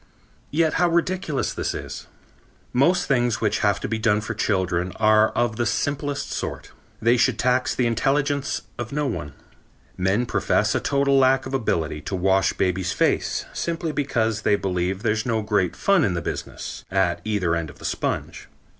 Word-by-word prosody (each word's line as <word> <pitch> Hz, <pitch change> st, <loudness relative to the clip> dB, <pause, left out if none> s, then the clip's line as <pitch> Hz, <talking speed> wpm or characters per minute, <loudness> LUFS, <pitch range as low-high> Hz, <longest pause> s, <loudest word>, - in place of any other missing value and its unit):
Yet 160 Hz, +1 st, +2 dB
how 175 Hz, -, +4 dB
ridiculous 170 Hz, -3 st, 0 dB
this -, -, -2 dB
is. -, -, -7 dB, 0.7 s
Most 150 Hz, +9 st, +3 dB
things 120 Hz, -4 st, +1 dB
which 105 Hz, -2 st, 0 dB
have 100 Hz, -1 st, +2 dB
to -, -, -2 dB
be 110 Hz, 0 st, -2 dB
done 110 Hz, -2 st, +2 dB
for 110 Hz, +1 st, -4 dB
children 95 Hz, -4 st, 0 dB
are 110 Hz, 0 st, +4 dB
of 120 Hz, -2 st, 0 dB
the 120 Hz, -, 0 dB
simplest 145 Hz, +2 st, -2 dB
sort. -, -, -5 dB, 0.3 s
They 120 Hz, +2 st, +3 dB
should -, -, +2 dB
tax 125 Hz, +1 st, +1 dB
the 125 Hz, -, +1 dB
intelligence 140 Hz, +4 st, 0 dB, 0.2 s
of 120 Hz, -1 st, -4 dB
no 150 Hz, +1 st, -1 dB
one. 75 Hz, -, -4 dB, 0.6 s
Men 95 Hz, +6 st, +1 dB
profess -, -, +1 dB
a -, -, +1 dB
total 140 Hz, -1 st, +2 dB
lack 130 Hz, 0 st, +3 dB
of 130 Hz, -, -6 dB
ability 80 Hz, -, -1 dB
to 95 Hz, -, -4 dB
wash 95 Hz, +1 st, +2 dB
baby's 90 Hz, -1 st, 0 dB
face -, -, 0 dB
simply 165 Hz, -1 st, -2 dB
because 115 Hz, -7 st, 0 dB
they 105 Hz, -, +3 dB
believe 95 Hz, 0 st, -2 dB
there's 110 Hz, -1 st, +1 dB
no 115 Hz, -3 st, -1 dB
great 100 Hz, -4 st, 0 dB
fun 195 Hz, -5 st, +3 dB
in 95 Hz, -9 st, +1 dB
the 85 Hz, -, -2 dB
business, -, -, -6 dB
at 95 Hz, -2 st, +1 dB
either 100 Hz, -6 st, 0 dB
end 85 Hz, -2 st, -3 dB
of -, -, -13 dB
the -, -, -11 dB
sponge. -, -, -3 dB
115 Hz, 175 wpm, -23 LUFS, 95-140 Hz, 0.7 s, how